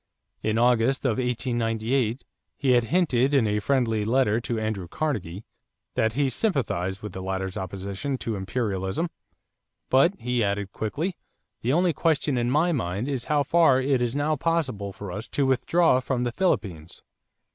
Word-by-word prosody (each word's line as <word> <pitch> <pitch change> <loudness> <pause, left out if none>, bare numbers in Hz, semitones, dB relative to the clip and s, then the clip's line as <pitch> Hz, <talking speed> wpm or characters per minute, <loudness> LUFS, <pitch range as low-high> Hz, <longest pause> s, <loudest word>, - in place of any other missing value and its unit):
In 110 0 0
August 125 +3 +2
of 130 -1 +1
1898 120 0 -1 0.3
he 135 -2 +2
had 120 -2 +4
hinted, 145 -4 +2
in 130 -5 +4
a 105 0 +1
friendly 115 -2 +1
letter 115 0 +2
to 115 -1 -3
Andrew 110 -5 -3
Carnegie, 105 - -3 0.5
that 110 0 +1
he 140 +2 +1
sympathized 105 - -1
with 105 - -5
the 95 - -6
latter's 95 0 -3
opposition 100 +8 -4
to 115 -3 -3
"imperialism"; 95 - -2 0.8
but 140 +9 +5
he 125 +1 -1
had 100 -3 +2
added 100 -1 -5
quickly: 155 - -3 0.4
"The 125 +4 +1
only 175 +1 +3
question 150 -3 +1
in 120 0 0
my 155 +6 +3
mind 105 - -2
is 135 -4 -2
how 150 -1 +2
far 150 -3 +4
it 130 -1 +1
is 120 +1 -1
now 150 +2 +1
possible 135 -11 -1
for 100 -1 -8
us 105 +5 -6
to 140 - 0
withdraw 135 +3 +3
from 125 -1 -1
the 120 - -1
Philippines." 95 - -2
120 Hz, 165 wpm, -25 LUFS, 105-140 Hz, 0.8 s, but